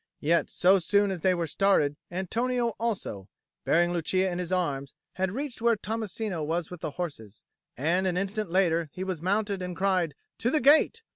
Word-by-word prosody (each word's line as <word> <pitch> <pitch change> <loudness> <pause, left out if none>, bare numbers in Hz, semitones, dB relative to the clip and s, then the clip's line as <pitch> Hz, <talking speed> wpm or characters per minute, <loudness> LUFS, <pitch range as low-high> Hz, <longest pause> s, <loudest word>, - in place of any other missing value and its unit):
Yet 165 +3 +2
so 190 +2 +4
soon 200 +3 +2
as 180 -3 -4
they 185 +1 +3
were 170 -1 -1
started, 160 -5 +2
Antonio 235 +7 -1
also, 190 - -3 0.4
bearing 175 +1 +3
Lucia 185 +3 0
in 175 - -3
his 180 0 -4
arms, 140 -7 -1 0.2
had 190 +1 -1
reached 270 +1 -5
where 235 0 +4
Tommasino 215 -3 -3
was 165 +2 -2
with 180 - -8
the - - -2
horses, 115 - -6 0.3
and 175 +8 +1
an 180 -1 0
instant 200 +1 -2
later 170 -3 +2
he 185 - -4
was 185 -4 -4
mounted 200 +1 0
and 180 -1 -5
cried, 185 -6 +1 0.2
"To 240 - +1
the 305 - +2
gate!" 305 - +4
185 Hz, 185 wpm, -28 LUFS, 170-205 Hz, 0.4 s, so